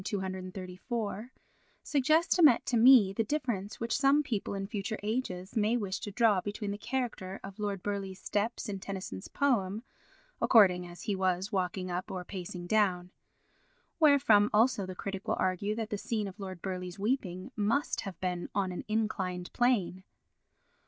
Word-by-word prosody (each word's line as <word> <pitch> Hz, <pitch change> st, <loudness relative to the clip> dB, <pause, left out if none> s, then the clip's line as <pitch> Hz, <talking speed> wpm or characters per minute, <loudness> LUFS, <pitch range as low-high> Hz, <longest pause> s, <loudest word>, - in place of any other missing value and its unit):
234) 190 Hz, +4 st, -4 dB, 0.5 s
suggests 310 Hz, +4 st, +3 dB
to 360 Hz, -, +2 dB
met 280 Hz, -8 st, +6 dB
to 250 Hz, -, 0 dB
me 230 Hz, -4 st, +7 dB
the 225 Hz, -, 0 dB
difference 220 Hz, -6 st, -3 dB
which 230 Hz, 0 st, -1 dB
some 280 Hz, +2 st, +4 dB
people 220 Hz, -7 st, -3 dB
in 195 Hz, 0 st, -3 dB
future 210 Hz, +1 st, -3 dB
ages 210 Hz, -3 st, -3 dB
may 220 Hz, +2 st, +2 dB
wish 200 Hz, -4 st, -3 dB
to -, -, -5 dB
draw 210 Hz, -2 st, +3 dB
between 205 Hz, +1 st, -4 dB
the 205 Hz, -, -4 dB
character 230 Hz, -6 st, -3 dB
of 195 Hz, +2 st, -9 dB
Lord 200 Hz, -3 st, -3 dB
Burleigh's 195 Hz, -2 st, -3 dB
steps 220 Hz, +4 st, -2 dB
in 200 Hz, -2 st, -4 dB
Tennyson's 185 Hz, -, -6 dB
poem, 220 Hz, -7 st, 0 dB, 0.6 s
according 180 Hz, -6 st, +5 dB
as 175 Hz, 0 st, -11 dB
he 205 Hz, -, -1 dB
was 185 Hz, 0 st, 0 dB
walking 185 Hz, -1 st, -2 dB
up 180 Hz, +1 st, -3 dB
or 180 Hz, -1 st, -5 dB
pacing 180 Hz, -2 st, -6 dB
down. 180 Hz, -3 st, +1 dB, 0.9 s
Wherefrom 280 Hz, -9 st, +5 dB
also 215 Hz, -3 st, +3 dB
the 185 Hz, -, -6 dB
critic 195 Hz, +1 st, -6 dB
will -, -, 0 dB
argue 185 Hz, +3 st, 0 dB
that 225 Hz, 0 st, -4 dB
the 210 Hz, -, -2 dB
scene 215 Hz, -2 st, -2 dB
of 195 Hz, +2 st, -10 dB
Lord 185 Hz, -3 st, -7 dB
Burleigh's 180 Hz, -1 st, -4 dB
weeping 200 Hz, -2 st, -2 dB
must 230 Hz, +7 st, 0 dB
have 195 Hz, -5 st, -7 dB
been 180 Hz, -1 st, -3 dB
on 195 Hz, -2 st, 0 dB
an 180 Hz, -, -5 dB
inclined 195 Hz, -5 st, -2 dB
plane. 210 Hz, -7 st, +1 dB
200 Hz, 165 wpm, -31 LUFS, 185-230 Hz, 0.9 s, me